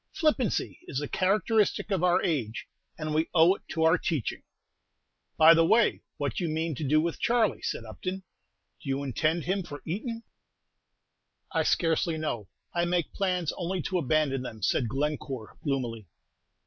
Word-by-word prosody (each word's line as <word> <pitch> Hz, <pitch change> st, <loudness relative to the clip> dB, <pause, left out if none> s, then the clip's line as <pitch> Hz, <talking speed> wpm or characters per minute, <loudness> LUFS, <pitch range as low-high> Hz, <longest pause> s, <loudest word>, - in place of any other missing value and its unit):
Flippancy 295 Hz, -, 0 dB
is 135 Hz, -, -4 dB
the 145 Hz, +1 st, -1 dB
characteristic 210 Hz, +4 st, +1 dB
of 185 Hz, -3 st, +1 dB
our 180 Hz, -1 st, +3 dB
age, 120 Hz, -10 st, -2 dB, 0.3 s
and 155 Hz, -1 st, -3 dB
we 160 Hz, +1 st, +1 dB
owe 170 Hz, +2 st, +7 dB
it -, -, -10 dB
to 160 Hz, -, -1 dB
our 165 Hz, +2 st, +5 dB
teaching." 150 Hz, -9 st, -2 dB, 1.0 s
"By 160 Hz, +1 st, +9 dB
the 165 Hz, 0 st, +5 dB
way, 225 Hz, +7 st, +3 dB, 0.2 s
what 140 Hz, -5 st, -1 dB
do 175 Hz, -, -3 dB
you 170 Hz, -, 0 dB
mean 160 Hz, +1 st, -1 dB
to 150 Hz, -, -5 dB
do 150 Hz, +2 st, +3 dB
with 165 Hz, +1 st, -1 dB
Charley?" 230 Hz, -3 st, +2 dB
said 115 Hz, -, -3 dB
Upton. 185 Hz, -, -5 dB, 0.6 s
"Do 140 Hz, -, -7 dB
you 135 Hz, +1 st, -1 dB
intend 155 Hz, +5 st, 0 dB
him 190 Hz, +2 st, 0 dB
for 145 Hz, -5 st, -9 dB
Eton?" 230 Hz, -, -4 dB, 1.3 s
"I -, -, +1 dB
scarcely 165 Hz, -1 st, +1 dB
know, 120 Hz, -10 st, -3 dB, 0.3 s
I 170 Hz, -, +1 dB
make 175 Hz, -2 st, 0 dB
plans 180 Hz, -5 st, 0 dB
only 180 Hz, -1 st, -2 dB
to 185 Hz, -1 st, 0 dB
abandon 150 Hz, -3 st, +1 dB
them," 110 Hz, -5 st, -8 dB
said 120 Hz, +3 st, +1 dB
Glencore, 135 Hz, -3 st, -3 dB
gloomily. 120 Hz, -, -2 dB
160 Hz, 165 wpm, -28 LUFS, 140-180 Hz, 1.3 s, By